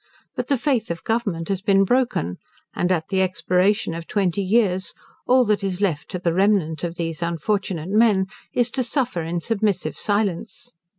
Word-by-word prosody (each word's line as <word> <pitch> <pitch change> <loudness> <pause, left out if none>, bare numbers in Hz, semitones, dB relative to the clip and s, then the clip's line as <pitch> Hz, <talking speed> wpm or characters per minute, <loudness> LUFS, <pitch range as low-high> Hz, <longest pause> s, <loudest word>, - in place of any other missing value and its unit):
But - - -3
the 280 - +2
faith 245 -4 0
of 165 -1 -4
Government 205 -8 -1
has 195 -1 -1
been 195 0 +4
broken, 215 - 0 0.3
and 180 - 0
at 165 -3 0
the 190 -1 +1
expiration 185 +1 +1
of 165 0 -6
twenty 200 -2 0
years, 190 -3 +1 0.3
all 255 0 +5
that 210 -1 +1
is 190 -2 -2
left 175 -8 -1
to 185 - -3
the 175 -2 0
remnant 185 -5 +2
of 170 -1 -3
these 165 -1 -3
unfortunate 170 0 -2
men, 210 -3 +4 0.3
is 245 -2 +1
to 260 - 0
suffer 245 - -1
in 170 +1 -3
submissive 195 -8 -1
silence. 205 -4 -2
190 Hz, 175 wpm, -22 LUFS, 170-215 Hz, 0.3 s, all